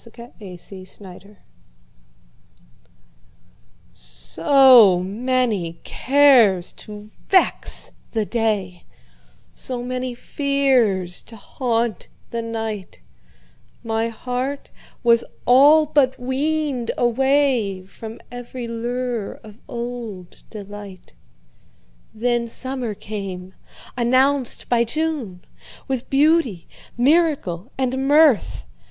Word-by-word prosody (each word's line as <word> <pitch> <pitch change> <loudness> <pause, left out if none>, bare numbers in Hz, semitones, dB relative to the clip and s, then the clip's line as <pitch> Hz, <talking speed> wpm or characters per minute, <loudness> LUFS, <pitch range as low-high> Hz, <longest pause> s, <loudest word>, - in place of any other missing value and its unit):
Summer 235 +1 -13 0.7
Magic 200 +1 -13 2.6
SO 185 - +5
many 210 -5 -1
cares 250 -10 +4
to 210 -1 -11 0.3
vex 375 -2 +1 0.2
the 220 -2 -1
day, 205 -6 -2 0.7
So 245 -2 -6
many 255 0 -4
fears 250 -11 0
to 230 - -14
haunt 230 +1 -2 0.2
the 235 - -2
night, 225 -4 -5 0.8
My 225 0 -1
heart 250 +4 -4 0.3
was 235 -1 +4 0.2
all 290 +5 +6
but 280 -3 +2
weaned 270 -1 -2
awayFrom 235 -5 0
every 245 0 -7
lure 235 -1 -3
of 215 0 -14
old 235 -7 -7
delight. 205 - -10 1.0
Then 240 +1 -1
summer 255 -2 -3
came, 190 -3 -7 0.4
announced 255 +2 +1
by 235 -1 +3
June, 245 - -3 0.4
With 260 -3 -3
beauty, 275 - +2 0.3
miracle 265 - +1
and 265 +1 -1
mirth. 290 - +3
235 Hz, 80 wpm, -21 LUFS, 205-265 Hz, 2.6 s, all